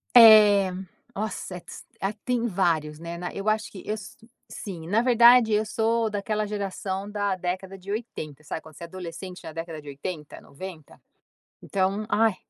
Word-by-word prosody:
É 210 -4 +9 0.4
nossa, 210 -3 -4
eh, - - -6
tis - - -11
ah, 195 +2 -1
tem 245 -2 +1
vários, 165 -7 0
né. 170 +1 -6
Na 175 0 -5
eu 200 +2 -1
acho 220 +2 0
que 190 - -10
eu 215 +1 -2
so 210 0 -11 0.3
sim. 170 -6 -7
Na 210 +6 +3
verdade, 240 -2 +6
eu 210 +1 +2
sou 225 +1 +1
daquela 210 +1 -1
geração 200 -1 -3
da 205 -2 0
década 185 +1 -4
de 190 +1 -8
80, 155 - -5
sabe, 160 - -5
quando 160 -1 -15
você - - -10
é - - -6
adolescente 180 +1 -8
na - - -7
década 165 -1 -6
de 150 - -16
80, 150 +2 -6
90, 165 0 -10 0.6
então 195 +2 0
ai 220 -3 +3
195 Hz, 180 wpm, -26 LUFS, 170-215 Hz, 0.6 s, É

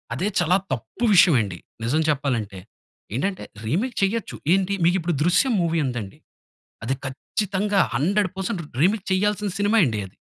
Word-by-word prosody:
అదే 180 +10 -1
చాలా 175 +1 +3 0.2
తప్పు 130 - -4
విషయం 175 -5 +6
అండి. 95 -4 -4 0.3
నిజం 150 +7 +1
చెప్పాలంటే. 120 -9 -1 0.6
ఏంటంటే 190 +8 -2 0.2
రీమేక్ 200 - -1
చేయొచ్చు 215 +2 -1 0.2
ఏంటి 195 +1 +1
మీకు 175 - +4
ఇప్పుడు 170 +1 -1
'దృశ్యం' 185 +8 +3
మూవీ 165 -1 +1
ఉందండి. 115 -6 -5 0.6
అది 130 - 0
ఖచ్చితంగా 200 +8 -1 0.2
100% 190 +4 0
రీ - - -12
రీమేక్ 195 +4 +2
చేయాల్సిన 205 +1 0
సినిమా 205 +3 +3
అండి 110 -4 -1
అది. - - -22
180 Hz, 145 wpm, -23 LUFS, 135-200 Hz, 0.6 s, విషయం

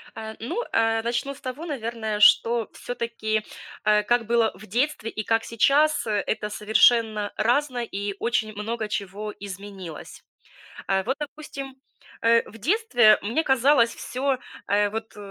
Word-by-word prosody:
А, 220 0 -6
ну, 245 - -3
а 225 0 +2
начну 240 +4 -2
с 280 - -16
того, 255 +6 -6
наверное, 230 -7 -3
что 230 +2 +5
всё-таки, 230 -3 -3 0.4
а 210 0 +3
как 240 +2 +1
было 230 0 +2
в 195 +4 -13
детстве 240 +2 -1
и 215 - -4
как 225 +1 +1
сейчас, 285 +5 +3
э, 210 -2 0
это 210 -1 -2
совершенно 215 0 +3
разное 245 +2 +1
и 200 +1 -2
очень 220 -2 0
много 215 +2 -3
чего 205 +1 -4
изменилось. 195 -4 -9 0.6
А, 190 0 +1
вот, 265 +6 -2
допустим, 280 -2 -7 0.5
э, 230 0 +4
в 225 - -13
детстве 245 - +4
мне 235 +10 0
казалось 265 -3 +3
всё, 265 +1 -2 0.3
э, 205 +1 +2
вот 220 0 -6
225 Hz, 145 wpm, -25 LUFS, 210-250 Hz, 0.6 s, что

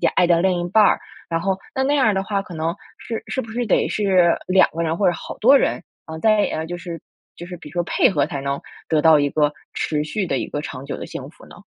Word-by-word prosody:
爱 - - +5
的 170 -1 +3
另 180 -1 +1
一 175 - -3
半 215 +4 +5
儿， - - +3 0.3
然 165 -1 -1
后 190 +1 0 0.2
那 265 - +1
那 280 +2 +1
样 275 - +3
儿 215 - +3
的 190 0 -1
话， 200 0 -1
可 185 - -11
能 160 +1 -2 0.2
是 225 - -5
是 260 - -2
不 225 - -10
是 240 +2 -2
得 - - +2
是 185 -5 +3
2 185 0 +5
个 165 - -3
人 165 0 -1
或 200 - +1
者 - - -1
好 - - -8
多 265 +5 +7
人， 180 - -1 0.2
嗯， 160 0 -7
在 210 -7 +2
就 175 +2 -5
是 170 -3 -7 0.3
就 175 - -9
是 180 0 -8
比 165 - -12
如 150 - -13
说 175 0 0
配 - - +3
合 145 -7 +1
才 140 - -5
能 140 0 -3 0.3
得 155 -2 +2
到 160 -1 +6
一 145 0 +1
个 150 0 +1 0.2
持 150 -1 -1
续 195 +5 -2
的 - - -1
一 - - -3
个 145 - -4
长 135 -3 -7
久 140 - -4
的 - - -7
幸 - - -8
福 - - -17
呢？ - - -14
175 Hz, 290 characters per minute, -21 LUFS, 160-200 Hz, 0.3 s, 多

